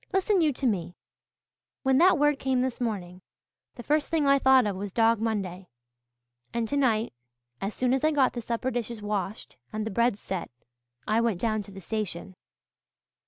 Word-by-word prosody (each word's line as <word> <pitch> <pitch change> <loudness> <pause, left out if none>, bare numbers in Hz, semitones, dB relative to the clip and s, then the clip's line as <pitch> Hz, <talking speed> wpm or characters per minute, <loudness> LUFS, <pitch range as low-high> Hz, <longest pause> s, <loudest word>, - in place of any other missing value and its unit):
Listen 385 0 +2
you 310 -2 +3
to 265 - -4
me. 180 -7 -1 0.9
When 265 0 +3
that 365 -1 +6
word 295 -1 +2
came 260 -1 +1
this 255 -1 -2
morning 185 -6 -3 0.5
the 240 - -9
first 300 +4 +1
thing 320 -3 +1
I 275 0 +5
thought 265 -2 +5
of 205 -2 -1
was 195 +1 -5
Dog 230 +1 +3
Monday. 195 -5 -2 0.9
And 230 -1 0
tonight, 235 - +1 0.5
as 200 +2 -3
soon 255 0 +1
as 265 - 0
I 310 - +5
got 280 -4 +2
the 240 - -4
supper 235 +3 -2
dishes 235 -1 -4
washed 205 0 -4
and 215 0 -3
the 220 - -3
bread 235 +1 +2
set, 190 -4 -5 0.6
I 220 +1 +2
went 230 -6 0
down 215 0 0
to 200 - -12
the 195 0 -10
station. 190 -2 -4
230 Hz, 180 wpm, -27 LUFS, 205-265 Hz, 0.9 s, that